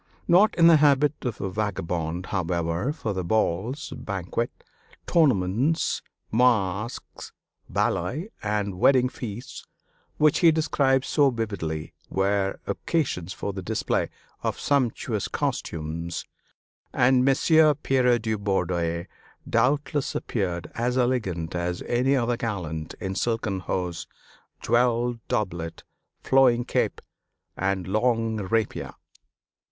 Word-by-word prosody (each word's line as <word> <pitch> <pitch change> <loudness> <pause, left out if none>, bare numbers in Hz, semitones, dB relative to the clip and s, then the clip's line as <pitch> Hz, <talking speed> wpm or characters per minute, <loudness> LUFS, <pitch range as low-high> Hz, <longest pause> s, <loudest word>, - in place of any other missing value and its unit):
Not 185 +5 +5
in 170 - +5
the 165 -1 +8
habit 145 0 +4
of 120 - -3
a 95 - -3
vagabond, 90 -4 -2
however, 85 - -1
for 115 -9 -3
the 95 -1 -2
balls, 110 - -1
banquets, 100 +4 -4 0.4
tournaments, 130 - +2 0.3
masques, 110 -2 0 0.4
ballets, 160 - -1
and 105 -3 -2
wedding 130 +1 +5
feasts 120 0 -7 0.5
which 150 -1 +4
he 170 -2 +6
describes 140 -4 +1
so 145 -2 +4
vividly 100 -10 -4 0.2
were 95 0 0
occasions 125 - -1
for 100 - -4
the 95 - -5
display 90 - -1 0.3
of - - -2
sumptuous 135 -5 0
costumes; 85 +1 -3 0.7
and 125 +1 +4
Messire 150 +3 +5
Pierre 130 -4 +2
de 110 -1 -2
Bourdeille 90 -5 -1 0.4
doubtless 140 +4 +1
appeared 90 -6 -2
as 125 +2 -1
elegant 105 -10 0
as 90 0 -2
any 130 +3 +2
other 120 -2 +1
gallant 85 -9 -4
in 95 0 -3
silken 110 -2 -1
hose, 90 -1 -3 0.5
jeweled 120 0 +2
doublet, 85 -9 -3 0.4
flowing 125 -3 +4
cape, - - 0 0.5
and 95 -1 -1
long 115 +2 +1
rapier. 110 +2 -2
110 Hz, 110 wpm, -25 LUFS, 90-130 Hz, 0.7 s, the